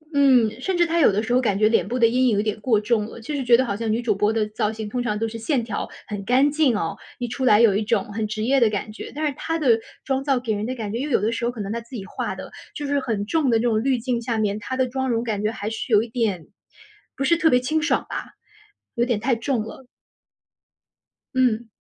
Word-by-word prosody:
嗯， 255 -4 +4
甚 375 +3 -1
至 345 - +4
她 335 0 0
有 280 - +6
的 210 +3 0
时 240 - -1
候 255 - +4
感 205 -6 +1
觉 215 +1 +4
脸 225 -3 +2
部 245 - -2
的 235 - +5
阴 255 +2 +2
影 230 - +3
有 - - +3
点 215 -1 -2
过 220 -4 +3
重 210 0 0
了， 230 - -10
就 265 +7 -5
是 275 - -2
觉 240 -1 +6
得 260 - +2
好 200 - -2
像 225 +1 -2
女 225 +2 0
主 225 -4 +1
播 210 +2 +2
的 220 -1 0
造 210 0 -1
型 220 -1 -6
通 245 +4 -2
常 210 -3 -1
都 225 - -1
是 225 +1 -7
线 240 +2 0
条 220 -3 -4 0.2
很 205 -2 -5
干 265 +6 +3
净 290 -7 +2
哦， 165 -5 -2 0.2
一 245 - -3
出 250 +3 -4
来 210 -4 +6
有 215 -4 +5
一 210 - +1
种 210 -1 -1
很 215 0 -2
职 215 0 -3
业 270 +3 +3
的 230 -3 +4
感 210 +1 -3
觉。 215 - -8
但 310 +1 -2
是 295 - 0
她 325 +4 -2
的 245 -8 +3 0.2
妆 270 0 -1
造 275 -3 +1
给 235 -3 -2
人 205 0 -2
的 255 - -3
感 215 -4 -5
觉 235 - -2
因 285 - -2
为 290 - -3
有 - - +4
的 215 +4 0
时 235 +1 -2
候 240 - 0
可 230 -4 -7
能 200 - -4
她 235 +1 -3
自 235 +3 -12
己 195 -4 -6
画 - - -4
的， - - -9 0.2
就 295 - -4
是 285 0 +1
很 220 -6 -2
重 290 +3 +1
的 230 - +4
那 225 - -1
种 225 -2 +1
滤 265 -1 +2
镜 240 0 -2
下 230 -1 -2
面 210 -1 0
她 260 +5 -4
的 260 -1 +2
妆 265 +1 -2
容 230 -1 0
感 215 -4 -2
觉 215 +1 0
还 210 -2 -4
是 225 +2 -5
有 210 0 +5
一 - - -6
点 220 -8 -1 0.7
不 275 - -2
是 335 - +4
特 330 -1 +3
别 250 - +4
清 305 +5 0
爽 300 - +1
吧， - - -4 0.7
有 240 0 +2
点 235 -4 0
太 245 +3 +1
重 230 0 -1
了。 235 +4 -10 1.5
嗯。 240 -3 +2
235 Hz, 310 characters per minute, -23 LUFS, 215-260 Hz, 1.5 s, 有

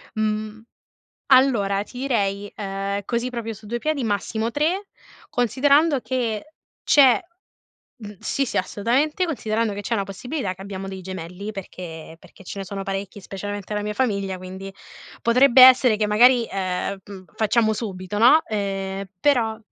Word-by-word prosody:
Mh. 215 0 -2 0.7
Allora 215 -7 +4
ti 245 +4 -11
direi, 205 -6 -1
uhm, 200 0 -3
così 240 +2 -1
proprio 230 -2 -5
su 215 0 -13
due 240 - -2
piedi, 295 +1 -1
massimo 220 +2 -1
3 335 - -1 0.4
considerando 280 +5 +3
che 250 +2 -3 0.3
c'è 270 -4 +5 0.8
mh, 210 -4 -9
sì, 275 - -1
sì, - - -3
assolutamente, 275 - 0
considerando 230 -8 -1
che 200 - -6
c'è 220 - -3
una 200 -3 0
possibilità 200 +2 -4
che 190 - -14
abbiamo 195 -1 -6
dei 190 0 -7
gemelli, 185 +3 -7
perché 165 -4 -9
perché 195 - -17
ce 195 +2 -7
ne 195 - -5
sono 195 0 -5
parecchi 195 +1 -5
specialmente 205 +1 -6
la 210 - -2
mia 210 0 -3
famiglia, 200 -6 -1
quindi 190 +1 -8 0.5
potrebbe 250 +2 +5
essere 255 -3 +8
che 210 0 0
magari, 240 +3 +5
ehm, 190 0 -2
mhmm, 195 -2 -11
facciamo 220 0 +2
subito, 200 -2 -5
no, 250 +9 +6
ehm, 195 -2 -3
però 235 -6 +2
215 Hz, 150 wpm, -23 LUFS, 195-245 Hz, 0.8 s, essere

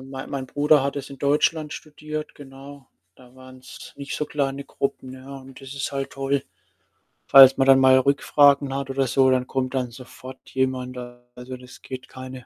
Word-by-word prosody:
mei 135 0 -8
mein 135 -2 -5
Bruder 145 +1 +3
hat 140 +1 -3
das 140 - -6
in 135 - -11
Deutschland 150 +2 +1
studiert, 155 0 -7
genau. 140 0 -13 0.3
Da 125 -1 -19
waren's 130 0 -13
nicht 140 -1 -6
so 150 - -2
kleine 140 -1 -3
Gruppen, 135 -2 -4
ja? 130 +1 -10
Und 135 0 -14
das 135 +1 -10
ist 140 0 -4
halt 135 0 -4
toll. 135 0 -2 0.9
Falls 135 -1 +9
man 135 - +2
dann 135 0 +7
mal 130 0 +6
Rückfragen 140 0 +3
hat 135 0 -4
oder 135 0 0
so, 130 +2 +3
dann 130 0 0
kommt 130 -1 -3
dann 125 -2 -2
sofort 130 +1 -13
jemand 130 -1 -2
da. 120 0 -10
Also, 125 +1 -8
das 125 +1 -15
geht 130 -1 -9
keine 130 -1 -10
135 Hz, 190 wpm, -23 LUFS, 130-140 Hz, 0.9 s, Falls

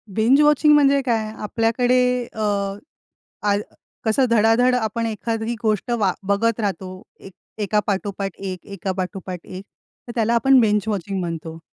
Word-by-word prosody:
Binge 245 +7 +4
watching 300 0 +5
म्हणजे 280 -1 +4
काय? 220 -3 0
आपल्याकडे 230 +4 +1 0.4
अ, 220 - -9 1.0
आ 205 -1 +2 0.5
कसं 225 +4 +2
धडाधड 230 +3 +4
आपण 230 -1 -1
एखादी 225 +1 -3
गोष्ट 215 +1 0
वा 195 -4 +2 0.2
बघत 230 +3 +1
राहतो, 185 -2 -4 0.2
एक 195 - -12 0.3
एका 210 +1 +1
पाठोपाठ 195 -1 -3
एक, 185 -2 -6
एका 195 -1 -4
पाठोपाठ 185 -1 -5
एक. 185 +1 -8 0.4
तर - - -5
त्याला 230 0 +1
आपण 260 +2 +5
बिंज 210 -3 +2
वॉचिंग 195 -2 -2
म्हणतो. 165 -2 -5
215 Hz, 145 wpm, -21 LUFS, 195-235 Hz, 1.0 s, वॉचिंग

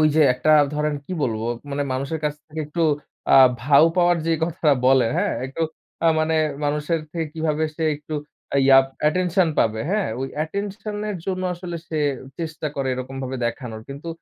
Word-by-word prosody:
ওই 155 - +5
যে 160 - +6
একটা 155 +5 +2 0.2
ধরেন 150 0 0
কি 185 - -7
বলবো, 115 -3 -1 0.2
মানে 145 +1 -1
মানুষের 140 +5 -3
কাছ 150 - 0
থেকে 155 0 -6
একটু 165 +3 -2 0.5
আ - - +8 0.3
ভাউ 140 +4 +6
পাওয়ার 175 0 +4
যে 165 - +2
কথাটা 160 -2 +1
বলে 130 -2 +5
হ্যাঁ? 205 +3 +1
একটু 135 +5 -4 0.4
আ - - +5
মানে 160 0 +1 0.3
মানুষের 150 +3 0
থেকে 165 -2 -2
কিভাবে 160 -1 0
সে 160 - -1
একটু 150 +1 -8 0.5
ইয়া 135 0 +8 0.2
অ্যাটেনশন 180 +3 +2
পাবে। 110 -1 +2
হ্যাঁ? 205 -1 +1
ওই 135 - -2
অ্যাটেনশন 200 +6 -3
এর 200 - -3
জন্য 185 -1 -2
আসলে 175 -1 -6
সে 160 - -2 0.4
চেষ্টা 160 -1 -4
করে 135 -1 -1
এরকমভাবে 130 +1 -5
দেখানোর। 115 -2 -5
কিন্তু 140 +4 -7
155 Hz, 175 wpm, -23 LUFS, 135-170 Hz, 0.5 s, আ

